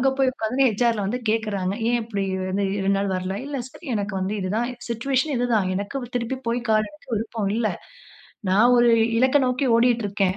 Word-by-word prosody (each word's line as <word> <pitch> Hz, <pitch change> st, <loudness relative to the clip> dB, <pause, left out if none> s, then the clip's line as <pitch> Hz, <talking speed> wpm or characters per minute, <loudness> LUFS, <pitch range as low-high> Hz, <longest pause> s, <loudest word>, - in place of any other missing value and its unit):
அங்க 270 Hz, -, +3 dB
போய் 265 Hz, -1 st, +3 dB
உக்கார்ந்தொனே 255 Hz, +3 st, +1 dB
ஹச்.ஆர்.ல 225 Hz, 0 st, +1 dB
வந்து 245 Hz, +5 st, -1 dB
கேட்குறாங்க. 205 Hz, -4 st, 0 dB, 0.2 s
ஏன் 240 Hz, -, +2 dB
இப்படி 210 Hz, -3 st, -3 dB, 0.3 s
வந்து 200 Hz, +2 st, 0 dB
2 195 Hz, 0 st, +1 dB
நாள் 200 Hz, -, -1 dB
வரல. 185 Hz, +1 st, -2 dB
"இல்ல 285 Hz, 0 st, -4 dB
சார் -, -, -17 dB
எனக்கு 205 Hz, -1 st, -2 dB
வந்து 190 Hz, +2 st, -1 dB
இதுதான் 215 Hz, +6 st, -1 dB, 0.2 s
"சிட்யூவேஷன் 265 Hz, +5 st, 0 dB
இது 245 Hz, +1 st, +1 dB
தான். 195 Hz, -4 st, +2 dB
எனக்கு 200 Hz, +8 st, -3 dB, 0.2 s
திருப்பி 245 Hz, +2 st, -2 dB
போய் 235 Hz, +1 st, 0 dB
கால் 215 Hz, -1 st, +3 dB
எடுக்க 300 Hz, -2 st, -20 dB
விருப்பம் 220 Hz, -1 st, -2 dB
இல்ல. 225 Hz, -2 st, +1 dB, 0.8 s
நான் 220 Hz, +6 st, +5 dB
ஒரு 240 Hz, 0 st, +5 dB, 0.3 s
இலக்க 260 Hz, +3 st, +4 dB
நோக்கி 250 Hz, +2 st, 0 dB
ஓடிக்கிட்டு 235 Hz, -1 st, +3 dB
இருக்கேன். 195 Hz, -1 st, 0 dB
225 Hz, 190 wpm, -23 LUFS, 200-245 Hz, 0.8 s, நான்